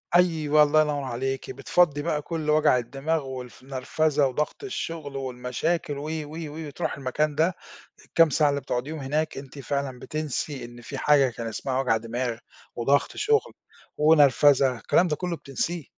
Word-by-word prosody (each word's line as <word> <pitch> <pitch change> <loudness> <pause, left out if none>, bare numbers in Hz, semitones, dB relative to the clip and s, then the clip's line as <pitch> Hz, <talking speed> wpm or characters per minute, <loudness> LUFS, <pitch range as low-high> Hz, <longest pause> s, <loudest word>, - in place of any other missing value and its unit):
أيوَه، 155 -4 +4
الله 155 +1 +4
ينوّر 145 -2 -1
عليكِ، 130 +1 -3
بتفَضّي 155 -5 +2
بقى 150 -2 -1
كل 155 -1 -4
وجع 150 -4 +4
الدماغ، 140 +5 -2
والف 125 -1 -8
نرفزة، 140 +2 +1
وضغط 150 - -3
الشغل 165 - -5
والمشاكل 135 +4 -2
و - - -5
و 155 -1 -4 0.2
و 155 +1 -7
وتروحي 140 - -3
المكان 145 +3 -1
ده، 165 +3 +2 0.5
الكام 165 -2 +4
ساعة 150 0 +3
اللي 140 0 -1
بتُقعُديهم 135 +4 -3
هناك، 150 +3 -1
أنتِ 135 +1 -9
فعلًا 140 -2 -3
بتنسي 150 -3 -4
إن 120 0 -12
في - - -7
حاجة 140 -3 +4
كان 115 -1 -6
اسمها 130 +4 -2
وجع 115 -4 +2
دماغ، 115 +1 -3 0.4
وضغط 135 +4 +1
شغل، 440 0 +1 0.4
ونرفزة، 145 -3 +5
الكلام 180 +9 +2
ده 150 - 0
كُلُّه 180 0 -3
بتنسيه. 155 +4 -4
145 Hz, 160 wpm, -26 LUFS, 130-155 Hz, 0.5 s, ونرفزة